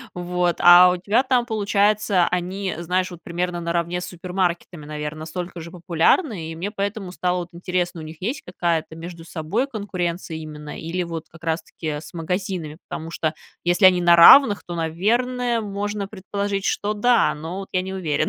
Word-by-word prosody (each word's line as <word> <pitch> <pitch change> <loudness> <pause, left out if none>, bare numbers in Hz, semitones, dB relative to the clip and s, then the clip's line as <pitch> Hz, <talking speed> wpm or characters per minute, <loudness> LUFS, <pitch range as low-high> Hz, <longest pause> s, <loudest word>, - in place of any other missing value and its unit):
вот. 175 0 0
А 175 +1 +9
у 180 - -1
тебя 210 +7 +2
там 255 -3 +1
получается, 205 -3 +2
они, 185 +2 -2
знаешь, 180 +2 -1
вот 175 -1 -10
примерно 175 0 -3
наравне 170 +1 -1
с - - -4
супермаркетами, 180 -3 -3
наверно, 150 0 -5
настолько 175 +2 -6
же 170 - -8
популярны, 175 - +1
и - - -7
мне 195 +5 -4
поэтому 200 -2 -3
стало, 180 0 -1
вот, 175 - -8
интересно: 175 -1 -2
у - - -8
них 155 0 -9
есть 265 +7 -2
какая-то 170 -3 -2
между 165 0 -9
собой 170 - -2
конкуренция 180 - -4
именно 150 -1 -8
или 175 +2 -2
вот 165 -2 -6
как 165 0 -17
раз 160 0 -1
таки 155 -2 -5
с - - -12
магазинами? 170 -2 -3
Потому 160 +1 -6
что 155 -2 -2 0.3
если 175 +3 +3
они 180 -1 +6
на 175 0 +6
равных, 205 +5 +8
то, 175 - -6
наверное, 235 +9 0
можно 205 -1 -3
предположить, 200 0 -3
что 210 +1 0
да, 240 +3 +3
но 165 +5 -6
вот 195 - -7
я 185 - +1
не 190 0 -5
уверена, 165 -6 -2
180 Hz, 180 wpm, -22 LUFS, 165-200 Hz, 0.3 s, А